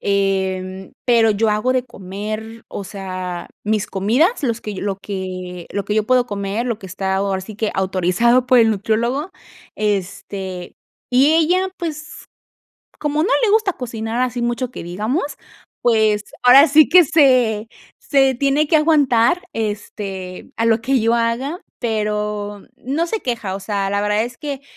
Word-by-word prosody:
em, 190 -1 -1
pero 230 -2 +4
yo 215 +1 +1
hago 215 +5 +1
de 255 -1 +1
comer 215 +1 -7
o 200 - -6
sea, 185 -2 -6 0.2
mis 210 -1 0
comidas, 245 - +1
los 235 -4 -1
que 210 - -5
lo 195 0 -2
que 185 -3 -6
lo 200 -1 -3
que 210 - -2
yo 215 -1 +1
puedo 255 0 +3
comer, 205 0 -3
lo 235 -4 -2
que 195 - -10
está, 190 +1 -2
ahora 195 -1 -1
sí 215 +3 -9
que, 215 +1 -1
autorizado 190 +7 +2
por 250 0 +5
el 225 -1 +5
nutriólogo. 230 - -1 0.5
Este, 195 -2 -3 0.4
y 270 +5 +4
ella, 355 +4 +2
pues, 310 -4 -6 0.7
como 295 0 -1
no 360 - +1
le 430 - +3
gusta 430 -3 +3
cocinar 230 -3 -4
así 245 -1 -2
mucho 240 +1 -1
que - - -7
digamos, 215 - -3 0.5
pues, 220 -3 +3 0.2
ahora 265 +5 +8
sí 300 +1 +5
que 360 0 +8
se 255 -8 +3 0.3
se 270 -2 +3
tiene 280 +4 +2
que 315 - +3
aguantar, 300 -1 +3
este, 205 -4 -5
a 230 - +1
lo 225 -1 +3
que 265 +3 +1
yo 230 +1 +2
haga, 235 +8 -1 0.2
pero 210 -2 -2
no 295 +7 -2
se 440 +5 -3
queja. 230 -7 -3
O - - -5
sea, 195 0 -2
la 200 0 0
verdad 210 +1 +1
es 240 +1 -7
que 285 -3 -5
220 Hz, 160 wpm, -19 LUFS, 200-255 Hz, 0.7 s, ahora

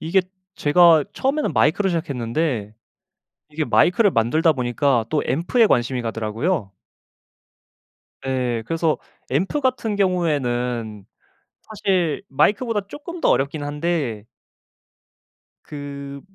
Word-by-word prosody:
이게 180 +4 +2 0.3
제가 160 +1 +5
처음에는 285 +3 -1
마이크로 195 +5 +2
시작했는데 130 - -2 0.8
이게 155 +1 -2
마이크를 195 +7 +3
만들다 155 +8 +2
보니까 125 -1 +1
또 155 - +1
앰프에 175 - +2
관심이 125 - +1
가더라고요. 115 - -2 1.6
예 125 -3 -1
그래서 165 0 0 0.3
앰프 190 - 0
같은 250 -5 -1
경우에는 125 - -1 0.6
사실 190 -7 -1
마이크보다 210 - +1
쪼끔 335 - -8
더 - - +2
어렵긴 145 +2 +1
한데 145 -7 -2 1.4
그 140 -1 -8
150 Hz, 255 characters per minute, -22 LUFS, 125-180 Hz, 1.6 s, 제가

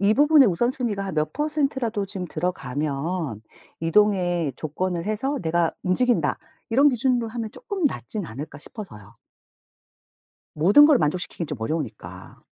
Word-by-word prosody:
'이 200 +2 +4
부분의 290 -2 +6
우선순위가 220 +1 -1
한 195 - -4
몇 155 - -1
퍼센트라도 275 -9 -1
지금 190 -2 -5
들어가면 150 - -3 0.4
이동의 175 -4 +2
조건을 170 +3 -3
해서 250 +7 -1
내가 165 0 +1
움직인다.' 185 - +2 0.3
이런 275 +6 +5
기준으로 245 -2 +1
하면 225 -1 -5
조금 400 - -5
낫진 215 -7 -3
않을까 140 +6 -8
싶어서요. 115 - -10 1.4
모든 200 - +7
걸 300 -4 +5
만족시키긴 170 +1 -1
좀 150 - -5
어려우니까. 105 - -5
190 Hz, 330 characters per minute, -24 LUFS, 155-245 Hz, 1.4 s, 모든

